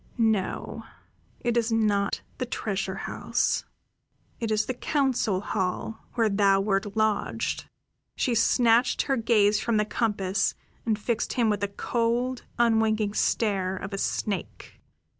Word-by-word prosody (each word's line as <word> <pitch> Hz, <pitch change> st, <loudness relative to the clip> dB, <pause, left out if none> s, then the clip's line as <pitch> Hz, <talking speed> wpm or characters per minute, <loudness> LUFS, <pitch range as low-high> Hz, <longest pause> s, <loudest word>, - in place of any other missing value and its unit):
"No, 220 Hz, -5 st, 0 dB, 0.6 s
it 240 Hz, -1 st, 0 dB
is 235 Hz, -1 st, +1 dB
not 205 Hz, -3 st, +1 dB, 0.2 s
the 255 Hz, -, 0 dB
treasure 195 Hz, -5 st, -2 dB
house. -, -, 0 dB, 0.7 s
It 230 Hz, -, -2 dB
is 215 Hz, 0 st, +1 dB
the 255 Hz, -, -2 dB
council 250 Hz, -8 st, 0 dB
hall, 190 Hz, +3 st, -2 dB, 0.2 s
where 230 Hz, -2 st, +3 dB
thou 195 Hz, -1 st, +3 dB
wert 200 Hz, +1 st, -1 dB
lodged." 215 Hz, -1 st, 0 dB, 0.5 s
She 250 Hz, -, 0 dB
snatched 235 Hz, +1 st, +3 dB
her 270 Hz, -, +1 dB
gaze 215 Hz, -3 st, +3 dB
from 230 Hz, -2 st, 0 dB
the 210 Hz, -, +2 dB
compass 200 Hz, -3 st, 0 dB, 0.3 s
and 220 Hz, -2 st, +2 dB
fixed 220 Hz, +1 st, -1 dB
him 235 Hz, -4 st, +2 dB
with 205 Hz, -, 0 dB
the 200 Hz, -, 0 dB
cold, 235 Hz, +4 st, -1 dB
unwinking 220 Hz, -3 st, +2 dB
stare 195 Hz, -4 st, +1 dB
of 195 Hz, +2 st, -6 dB
a 195 Hz, -, -2 dB
snake. 195 Hz, -3 st, -3 dB
215 Hz, 135 wpm, -27 LUFS, 200-230 Hz, 0.7 s, where